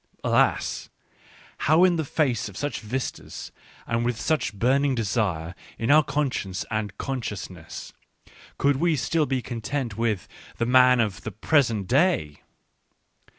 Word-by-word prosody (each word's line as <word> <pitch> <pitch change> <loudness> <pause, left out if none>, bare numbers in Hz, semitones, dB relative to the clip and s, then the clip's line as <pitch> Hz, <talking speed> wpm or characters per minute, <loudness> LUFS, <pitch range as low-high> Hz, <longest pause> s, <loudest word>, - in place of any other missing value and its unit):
Alas! - - +1 0.8
how 160 +3 +6
in 180 -2 +5
the 160 - 0
face 130 -7 0
of 100 - -11
such 145 0 -2
vistas, 125 +4 -5 0.3
and 115 0 0
with 120 -1 -1
such 155 -7 0
burning 130 +6 +2
desire 100 -7 -1 0.2
in 115 +4 +1
our 155 +1 +8
conscience 135 -11 -2
and 110 -2 -2
consciousness, 105 -10 -6 0.6
could 140 -1 +2
we 165 +2 +2
still 150 +3 +1
be 130 -2 -1
content 120 -1 -3
with 110 -5 0 0.3
the 115 - 0
man 125 0 +6
of 105 -4 0
the 110 - -5
present 115 - +2
day 130 - +1
125 Hz, 135 wpm, -25 LUFS, 105-145 Hz, 0.8 s, our